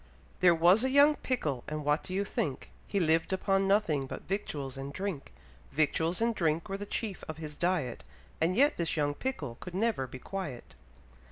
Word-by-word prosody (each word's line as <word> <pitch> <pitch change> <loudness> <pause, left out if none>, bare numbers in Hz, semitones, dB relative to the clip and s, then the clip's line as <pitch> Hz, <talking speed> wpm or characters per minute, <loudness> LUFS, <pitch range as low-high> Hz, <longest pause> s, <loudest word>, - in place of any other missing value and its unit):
There 180 -2 +6
was 175 +7 +5
a 260 - +2
young 285 +3 +6
pickle, 150 - -2
and 150 -1 -4
what 150 +1 +2
do 185 - -6
you 200 +1 +1
think? 145 -9 -3 0.2
He 200 - 0
liv'd 165 0 +2
upon 195 +1 +2
nothing 170 -9 +2
but - - -7
victuals 145 -9 -3
and 135 +1 -6
drink; 185 -3 -4 0.4
Victuals 160 +5 +1
and 230 0 +2
drink 165 -4 0
were 195 - -2
the 205 0 -6
chief 205 -4 -3
of 155 - -6
his 155 -2 -7
diet, 170 -8 -1 0.4
And 170 +3 +2
yet 280 +6 +4
this 165 -1 -1
young 145 -1 +1
pickle 145 - -4
could 180 -1 -8
never 205 - 0
be 130 - -8
quiet. 155 -4 -6
170 Hz, 190 wpm, -31 LUFS, 150-200 Hz, 0.4 s, There